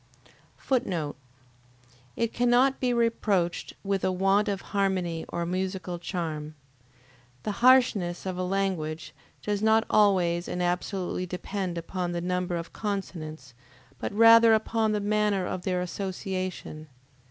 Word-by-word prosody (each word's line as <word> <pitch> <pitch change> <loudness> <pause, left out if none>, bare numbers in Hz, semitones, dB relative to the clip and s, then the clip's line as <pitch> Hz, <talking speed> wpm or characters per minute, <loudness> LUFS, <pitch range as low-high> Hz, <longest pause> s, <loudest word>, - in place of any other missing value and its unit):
[Footnote: 185 - -1 1.0
It 230 -1 -1
cannot 245 +3 +3
be 250 -1 +1
reproached 220 -7 0
with 195 -1 -1
a 185 - +2
want 195 +3 +2
of 200 -2 -2
harmony 185 -5 0
or 170 0 -2
musical 185 0 -3
charm. 155 -4 -4 0.9
The - - -2
harshness 235 -10 +4
of 185 -1 -3
a 180 - -3
language 180 -5 -2 0.3
does 205 -1 -1
not 220 +1 +4
always 180 -5 +3
and 180 - -4
absolutely 180 +1 -2
depend 180 0 -4
upon 175 +1 -3
the 175 - -1
number 180 0 -1
of 170 0 -6
consonants, 160 - -5 0.5
but - - -3
rather 230 +1 +7
upon 220 0 0
the 210 - 0
manner 205 -2 +1
of 180 - -3
their 180 -2 0
association. 185 -3 -4
190 Hz, 130 wpm, -27 LUFS, 175-210 Hz, 1.0 s, rather